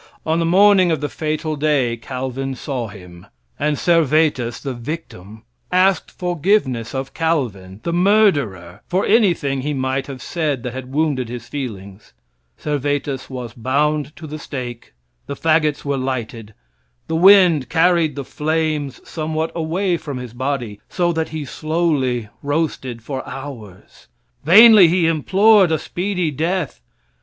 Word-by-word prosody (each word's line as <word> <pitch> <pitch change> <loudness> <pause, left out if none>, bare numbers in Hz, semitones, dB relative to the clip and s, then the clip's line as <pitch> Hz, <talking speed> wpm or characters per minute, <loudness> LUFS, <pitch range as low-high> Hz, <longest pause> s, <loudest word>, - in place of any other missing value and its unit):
On 160 +1 +1
the 165 - +1
morning 190 0 +5
of 160 -3 0
the 145 +1 -3
fatal 155 0 -3
day, 140 -5 +1
Calvin 130 +2 -5
saw 125 -2 -4
him; 90 -2 -13 0.3
and 150 -1 0
Servetus, 155 -7 +2
the 135 -2 -4
victim, 115 - -8 0.3
asked 185 -1 +2
forgiveness 175 - -1
of 135 0 -4
Calvin, 110 - -2
the 170 - -2
murderer, 155 - +2
for 185 +2 0
anything 170 - +2
he 145 +2 -2
might 130 0 -2
have 135 -2 -7
said 150 -8 -2
that 125 - -4
had 130 0 -7
wounded 140 -5 0
his 120 -1 -7
feelings. 100 - -7 0.4
Servetus 145 -2 -2
was 125 -4 -6
bound 145 +5 -1
to 160 - -10
the 155 0 -7
stake, 120 - -7 0.3
the 140 - -4
fagots 155 -1 +1
were 140 -1 -1
lighted. 115 -5 -4 0.5
The 160 - -2
wind 180 -5 +6
carried 165 -3 +2
the 140 -2 -5
flames 155 -2 -2
somewhat 160 0 -3
away 175 +3 -1
from 145 -5 -6
his 125 -2 -8
body, 120 -5 -3
so 175 -1 0
that 160 -1 -2
he 155 -2 -5
slowly 145 -7 -1
roasted 140 -5 -2
for 135 +1 -4
hours. 125 -8 -10 0.4
Vainly 210 +3 +8
he 175 +1 +2
implored 190 +4 +4
a 160 - +2
speedy 180 0 -2
death. 160 - -2
145 Hz, 140 wpm, -19 LUFS, 125-165 Hz, 0.5 s, Vainly